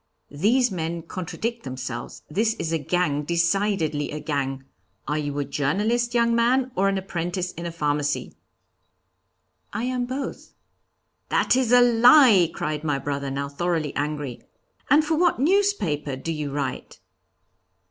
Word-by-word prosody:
'These 220 - +2
men 165 -2 -3
contradict 200 +7 -4
themselves; 130 -2 -6
this 220 +8 0
is 160 - -3
a 165 - +1
gang, 150 -1 0
decidedly 170 -1 0
a 150 - -5
gang 140 -3 -3 0.4
are 150 +2 0
you 145 -1 -3
a 145 - -1
journalist, 210 - 0
young 235 0 +3
man, 250 +3 +2
or 195 +1 +2
an 195 - 0
apprentice 180 -1 -3
in 170 +1 -6
a - - -4
pharmacy?' 145 -2 -1 1.4
'I 230 - -2
am 250 0 -1
both.' 265 +2 -6 0.8
'That - - +3
is 255 -3 +1
a 245 0 +7
lie!' 240 - +6
cried 150 -2 -3
my 150 -3 0
brother, 140 0 -3
now 140 +1 -3
thoroughly 160 0 -2
angry. 145 -3 -3 0.5
'And 295 +3 +5
for 320 - 0
what 345 +1 +2
newspaper 280 - +1
do 150 +5 -5
you 150 -2 -3
write?' 140 -2 -4
170 Hz, 145 wpm, -24 LUFS, 145-235 Hz, 1.4 s, a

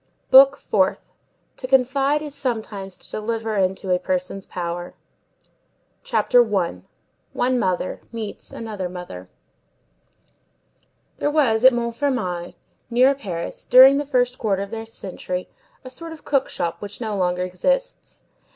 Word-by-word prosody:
BOOK 275 +1 +8
FOURTH—TO 200 +5 -3
CONFIDE 270 +3 +2
IS 295 -2 -6
SOMETIMES 215 -8 -4
TO - - -14
DELIVER 225 0 -3
INTO 190 0 0
A 180 - +3
PERSON'S 185 +1 -3
POWER 175 0 -5 1.1
CHAPTER 250 - +3
I—ONE 210 - -3
MOTHER 185 -4 -1
MEETS 225 -3 -7
ANOTHER 210 -5 -5
MOTHER 175 - -9 1.9
There 290 - 0
was, 260 -7 +2
at 260 - +9
Montfermeil, 235 -7 -2 0.3
near 255 +3 +4
Paris, 190 -11 -5
during 265 +3 +8
the 290 - -3
first 250 -2 0
quarter 200 -3 0
of 200 - -9
this 225 0 -6
century, 185 -3 -5 0.4
a 255 - -7
sort 330 +5 -6
of 315 - -14
cook 275 -2 +1
shop 170 - -3
which 205 0 -7
no 220 -3 -3
longer 180 -1 0
exists. - - -2
225 Hz, 125 wpm, -22 LUFS, 185-260 Hz, 1.9 s, at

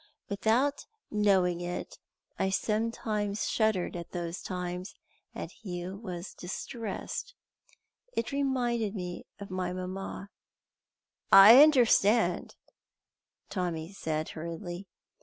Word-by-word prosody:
Without 225 +8 +1 0.2
knowing 190 -4 +3
it 175 0 -5 0.4
I 190 - +2
sometimes 210 0 -1
shuddered 220 -6 +1
at 170 -1 -7
those 175 0 -4
times, 180 0 -5 0.4
and - - -5
he 180 -5 -6
was 190 -3 -7
distressed. 230 - -5 0.8
It 230 - -2
reminded 245 -6 0
him 180 -2 -5 0.2
of 200 -2 -8
my 185 -1 -2
mamma." 185 +2 -6 1.0
"I 210 +7 +11
understand," 240 -6 +4 1.0
Tommy 175 -2 -3
said 155 -4 -2
hurriedly. 175 +3 -6
195 Hz, 95 wpm, -30 LUFS, 180-220 Hz, 1.0 s, I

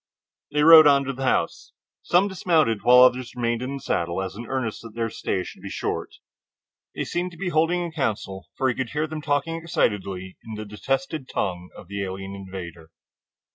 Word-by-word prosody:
They 150 0 +1
rode 160 -1 +10
on 140 -1 +5
to 135 0 -3
the 135 +1 -4
house. - - -1 0.3
Some 180 +3 +3
dismounted, 165 - +1
while 125 +1 +7
others 125 -1 +2
remained 120 -1 -1
in 130 +2 -3
the - - -5
saddle 85 +1 -1
as 95 -1 -5
an 115 +2 -8
earnest 130 -5 -3
that 115 -1 -11
their 115 -1 -2
stay - - -2 0.2
would - - -19
be - - -7
short. - - -4 0.8
They - - -2
seemed 175 +1 -2
to - - -13
be 180 +1 -2
holding 170 +2 +2
a 170 - -5
council, 105 -10 -3
for 130 - +1
he 130 - +2
could 130 0 -3
hear 150 +4 -1
them 155 0 -6
talking 145 +3 0
excitedly 100 - -2
in 110 - -7
the 110 0 -6
detested 135 +6 -3
tongue 90 -2 -3
of - - -12
the 100 +1 -4
alien 95 +1 -6
invader. 90 -4 -8
125 Hz, 200 wpm, -24 LUFS, 100-150 Hz, 0.8 s, rode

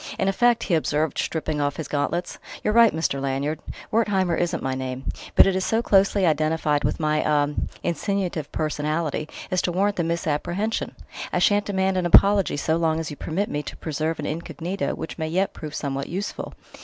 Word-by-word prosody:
"In - - 0
effect," 235 +4 +3
he 180 - -1
observed, 155 -2 +1
stripping 155 -2 -1
off 145 0 0
his 160 - -5
gauntlets, 160 +5 -2 0.2
"you're 210 - +1
right, 230 -1 +7
Mr. 155 -4 -1
Lanyard. 140 +3 -1 0.3
'Wertheimer' 195 -6 +2
isn't 175 0 -1
my 135 0 -1
name, 130 0 -4 0.3
but - - +8
it 195 - +2
is 190 - 0
so 225 +4 +1
closely 195 -1 +4
identified 155 -1 +1
with - - 0
my 155 -1 +1
ah 145 -1 +2 0.3
insinuative 175 -3 -2
personality 155 0 -2 0.2
as 185 - +2
to 180 - -1
warrant 200 +3 +1
the 170 - +1
misapprehension. 170 +6 -1 0.4
I - - 0
shan't 205 -1 +3
demand 190 -1 0
an 180 -1 +1
apology 195 -2 +5
so 160 +2 +1
long 160 -1 +1
as 160 -2 -4
you - - -6
permit 185 +8 -2
me 145 - -2
to - - -8
preserve 160 +1 -2
an 150 - -4
incognito 170 +1 -3
which 165 - -7
may 160 - -1
yet 185 +5 0
prove 150 -2 -7
somewhat 140 -1 -3
useful." 195 +4 -4
165 Hz, 190 wpm, -24 LUFS, 150-190 Hz, 0.4 s, but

